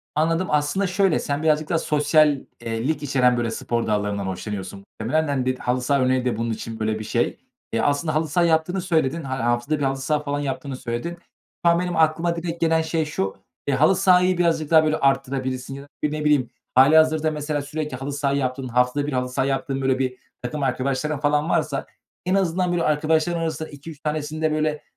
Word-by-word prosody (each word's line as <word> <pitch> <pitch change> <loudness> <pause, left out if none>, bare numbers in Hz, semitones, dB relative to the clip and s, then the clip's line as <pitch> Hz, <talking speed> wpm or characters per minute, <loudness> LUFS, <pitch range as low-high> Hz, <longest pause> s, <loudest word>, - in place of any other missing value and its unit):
Anladım. 165 +4 +1
Aslında 150 +6 +1
şöyle 190 -2 +2
sen 145 +2 -2
birazcık 155 -1 +2
daha 170 - +2
sosyal 150 -1 +3 0.2
eee, 115 +3 -3
lik 155 -2 -1
içeren, 125 -3 +3
böyle, 115 -1 -1
spor 115 0 -2
dallarından 105 -1 -1
hoşlanıyorsun 95 0 -5 0.2
muhtemelen. 155 +8 0
Hani, 135 -3 -1
dedi 130 0 -1
halı 125 +1 -1
saha 140 +2 +1
örneği 130 0 +2
de 120 -3 0
bunun 115 0 -1
için 110 0 -6
böyle 110 0 -1
bir - - -5
şey. 110 - -1 0.3
Eee, - - 0
aslında 145 +3 0
halı 160 +1 +1
saha 170 +4 +2
yaptığını 165 +3 +1
söyledin. 165 -3 0
Ha 130 -1 -3
haftada 120 +6 0
1 - - -1
halı 135 0 0
saha 150 +3 0
falan 145 0 -2
yaptığını 140 -1 -4
söyledin. 125 +8 -4 0.5
Şu - - +7
an 170 - +2
benim 180 -1 -2
aklıma 160 +2 +2
direkt 170 0 -5
gelen 165 0 +3
şey 160 0 -1
şu: 95 -11 -2 0.3
Eee, 140 - +2
halı 155 +8 +4
sahayı 185 -1 +4
birazcık 165 -3 +1
daha, 160 -1 +7
böyle, 155 0 +1
arttırabilirsin 135 -1 -1
ya 140 - -8
da, 145 - -17 0.2
bir, 150 - +1
ne 150 0 -3
bileyim, 145 -5 +3 0.3
hâlihazırda 155 +3 +5
mesela 150 -1 -2
sürekli 150 -2 -4
halı 140 +2 -5
saha 140 -1 0
yaptığın, 130 -1 -1
haftada 125 +4 +1
1 150 - -3
halı 125 0 -1
saha 130 +1 0
yaptığın, 135 0 -1
böyle, 130 0 +1
bir 130 -1 -1 0.2
takım 140 +4 -4
arkadaşların 135 +3 -1
falan 150 +2 +1
varsa, - - 0 0.4
en 185 +2 +1
azından, 180 -1 +1
böyle, 175 -1 0
arkadaşların 155 +2 +1
arasında 160 -1 -3
2-3 145 +1 -10
tanesini 155 0 -3
de, 155 -1 +2
böyle, 155 -1 -1
145 Hz, 205 wpm, -23 LUFS, 130-160 Hz, 0.5 s, Şu